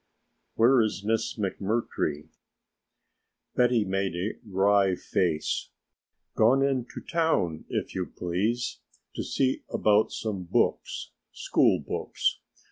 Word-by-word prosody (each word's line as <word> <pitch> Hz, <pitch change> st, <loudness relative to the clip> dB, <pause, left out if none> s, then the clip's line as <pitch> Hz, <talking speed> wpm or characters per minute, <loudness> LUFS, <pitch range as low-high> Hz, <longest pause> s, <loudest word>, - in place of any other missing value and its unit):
"Where 120 Hz, +2 st, +5 dB
is 105 Hz, -3 st, -1 dB
Miss 110 Hz, +2 st, -1 dB
McMurtry?" 100 Hz, -7 st, -2 dB, 1.3 s
Betty 120 Hz, -3 st, +3 dB
made 95 Hz, -2 st, -1 dB
a 95 Hz, +5 st, -2 dB
wry 100 Hz, -2 st, +3 dB
face. 85 Hz, -4 st, -1 dB, 0.6 s
"Gone 130 Hz, +5 st, +4 dB
into 130 Hz, -3 st, -2 dB
town, 130 Hz, -, 0 dB
if -, -, -3 dB
you 90 Hz, -1 st, -2 dB
please, 105 Hz, +8 st, -2 dB, 0.3 s
to -, -, -3 dB
see 130 Hz, -1 st, 0 dB
about 105 Hz, 0 st, +3 dB
some 100 Hz, -5 st, -4 dB
books -, -, 0 dB, 0.2 s
school -, -, +2 dB
books. -, -, -2 dB
105 Hz, 105 wpm, -27 LUFS, 95-120 Hz, 1.3 s, Where